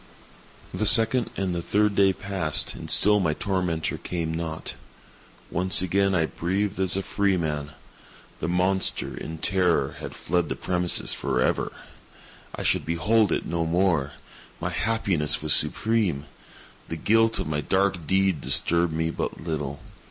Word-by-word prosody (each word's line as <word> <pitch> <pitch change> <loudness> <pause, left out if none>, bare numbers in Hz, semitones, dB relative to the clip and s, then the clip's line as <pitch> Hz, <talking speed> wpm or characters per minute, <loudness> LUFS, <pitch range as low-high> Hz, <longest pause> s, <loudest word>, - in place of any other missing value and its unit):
The 110 - 0
second 115 +3 +6
and 95 -2 -1
the 85 - -2
third 105 +3 +1
day 100 -1 +4
passed, 90 -6 -1
and - - -9
still 105 +1 +4
my 80 -5 0
tormentor 90 -4 -2
came 85 -2 -3
not. 80 -1 -4 0.8
Once 90 +1 +2
again 95 +1 +1
I 80 -2 +2
breathed 95 +5 -2
as 95 0 +1
a 95 - -2
freeman. 80 -9 -1 0.7
The - - -3
monster, 90 +2 0
in 80 0 -7
terror, 90 0 +1
had - - -7
fled 90 -1 -1
the - - -2
premises 90 -1 0
forever! 65 -2 -1 0.8
I - - -5
should - - +1
behold 100 +6 +1
it - - -1
no 85 -1 -1
more! 85 -5 +1 0.5
My - - -3
happiness 100 -11 0
was 75 - +4
supreme! 105 -11 +2 0.6
The 80 - -4
guilt 115 +7 +2
of - - -2
my 75 -1 -2
dark 95 0 0
deed 95 -4 +2
disturbed 85 -1 +1
me 80 +1 -1
but - - -4
little. 75 -4 -4
90 Hz, 145 wpm, -25 LUFS, 80-100 Hz, 0.8 s, second